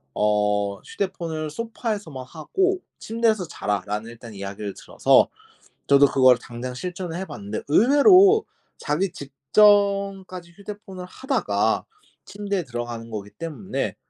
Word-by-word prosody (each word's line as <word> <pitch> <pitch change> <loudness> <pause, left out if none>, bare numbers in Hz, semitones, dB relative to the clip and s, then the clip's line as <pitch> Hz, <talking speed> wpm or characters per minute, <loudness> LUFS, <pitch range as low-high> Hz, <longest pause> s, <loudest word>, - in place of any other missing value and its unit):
어 105 -1 +1
"휴대폰을 165 -5 -4
소파에서만 205 - -5
하고 375 - -1 0.2
침대에서 220 -4 0
자라."라는 105 +2 -3
일단 115 -1 -11
이야기를 100 0 -6
들어서 - - +3 0.6
저도 140 0 +7
그걸 130 -2 +5
당장 120 +1 -7
실천을 180 +4 -5
해 190 - -4
봤는데 105 - -6
의외로 365 - +6 0.3
자기 170 +6 -1
직전까지 195 +4 +2
휴대폰을 200 -1 -9
하다가 265 +9 -1 0.4
침대에 200 -2 -3
들어가는 120 -3 -6
거기 105 -2 -6
때문에 150 - -4
165 Hz, 300 characters per minute, -23 LUFS, -, 0.6 s, 저도